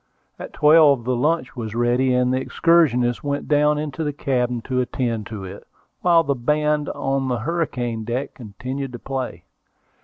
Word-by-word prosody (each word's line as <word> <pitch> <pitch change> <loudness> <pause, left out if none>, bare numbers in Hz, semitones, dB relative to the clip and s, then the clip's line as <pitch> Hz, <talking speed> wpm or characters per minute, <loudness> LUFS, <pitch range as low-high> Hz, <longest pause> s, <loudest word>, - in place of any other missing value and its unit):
At - - -8
twelve 150 -4 +5
the 125 +2 0
lunch 145 +2 0
was 110 -3 -5
ready, 120 +2 +2
and 125 0 +2
the 130 - 0
excursionists 130 -7 +2
went 145 0 -3
down 150 0 +3
into 150 0 -4
the 150 - -1
cabin 125 -4 -1
to 130 -1 -1
attend 120 -3 -2
to 105 -3 -7
it, 95 +1 -9 0.4
while 170 -2 +4
the 140 - 0
band 150 +3 0
on 135 0 -2
the 125 -1 0
hurricane 125 -5 -2
deck 125 +5 -3
continued 130 +4 -6
to - - -5
play. 130 -9 -5
130 Hz, 165 wpm, -22 LUFS, 120-150 Hz, 0.4 s, twelve